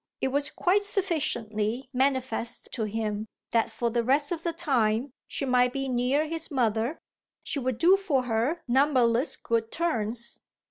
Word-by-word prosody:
It 265 - 0
was 285 +2 0
quite 395 +3 +1
sufficiently 265 - 0
manifest 260 -3 -1
to 225 -4 -1
him 215 0 -3 0.2
that 230 -1 +2
for 235 -1 -2
the 235 0 +1
rest 285 +5 +2
of 340 -2 -2
the 335 - -1
time 255 -6 0
she 275 - -3
might 250 -1 +3
be 270 0 -2
near 255 +4 +1
his 325 +1 -4
mother 235 -1 0 0.5
she 290 - -2
would 255 -3 -2
do 360 +9 +5
for 300 -10 0
her 245 +8 -1
numberless 255 -1 +3
good 230 -1 -1
turns. 235 -8 -2
255 Hz, 155 wpm, -27 LUFS, 230-295 Hz, 0.5 s, do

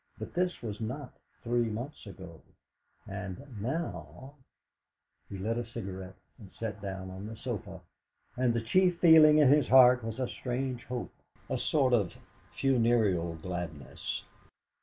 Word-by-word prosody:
But - - -7
this 180 -5 -1
was 110 -1 -5
not 125 +4 -5 0.3
three 120 -1 +1
months 120 +3 -6
ago, 90 -4 -11 0.7
and 95 -1 -5 0.2
now 120 - -4 1.0
He 100 - -6
lit 110 +5 -1
a - - -2
cigarette 95 -5 -7 0.2
and 100 -5 -13
sat 105 -3 -5
down 95 -1 -5
on 95 +3 -7
the 110 - -7
sofa, 100 -6 -5 0.5
and 125 -1 +2
the 115 - +1
chief 180 +9 +3
feeling 160 -3 +8
in 150 -4 +6
his 145 -2 +4
heart 125 -1 +7
was 115 0 -5
a 130 - 0
strange 125 0 -3
hope, 125 -1 -5 0.4
a - - +1
sort 135 -5 +2
of 100 -7 +1 0.3
funereal 115 -10 +2
gladness. 85 -3 -5
115 Hz, 140 wpm, -30 LUFS, 95-130 Hz, 1.0 s, feeling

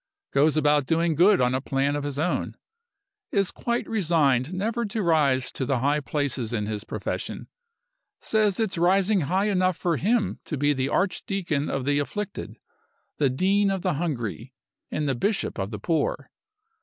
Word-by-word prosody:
Goes 150 +3 +3
about 150 -2 +3
doing 165 0 +2
good 185 +6 +5
on 125 0 +2
a 130 - 0
plan 140 +1 0
of 145 - -2
his 145 -1 -4
own. 160 +4 -1 0.7
Is 195 -2 +1
quite 235 0 -2
resigned 155 - +2
never 220 +6 -1
to 210 0 -2
rise 145 -6 +2
to - - -3
the 130 0 0
high 145 +4 +1
places 140 -5 -2
in 105 -2 -1
his 105 -1 -4
profession. - - -5 0.7
Says 215 -3 +1
it's 200 -6 0
rising 190 +3 +3
high 185 +7 +1
enough 185 -3 +1
for 170 -3 0
him 215 +2 0
to 155 - -4
be 145 +2 +2
the 135 0 -1
Archdeacon 185 -5 -1
of 135 -2 -2
the 145 0 +2
afflicted, 205 +7 -5 0.6
the 140 -3 +3
Dean 195 +9 +2
of 195 -2 -2
the 185 -2 +1
hungry, 130 - -4 0.3
and 150 -1 -2
the 135 - +1
Bishop 200 - -1
of 95 0 -2
the 105 - -5
poor. 155 +8 -1
155 Hz, 170 wpm, -25 LUFS, 135-195 Hz, 0.7 s, good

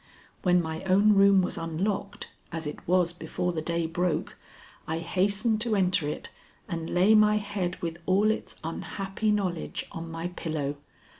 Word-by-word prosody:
When 180 -1 +3
my 160 0 -4
own 200 +3 +5
room 195 -1 +6
was 180 - -2
unlocked, 195 +5 -3 0.2
as 165 -1 -4
it 150 - -7
was 175 -1 +3
before 180 +1 -3
the 160 - -2
day 170 +1 -1
broke, 175 +1 -1 0.5
I 160 - -1
hastened 200 +6 +1
to 230 -2 +1
enter 180 -5 +2
it - - -6 0.4
and 165 -2 -4
lay 185 +5 +4
my 210 0 +5
head 200 -4 -3
with 170 0 -3
all 200 +3 +4
its 220 - -5
unhappy 195 +5 -3
knowledge 185 -5 -1
on 165 0 -6
my 165 +1 -4
pillow. 155 -5 -3
180 Hz, 160 wpm, -28 LUFS, 165-200 Hz, 0.5 s, room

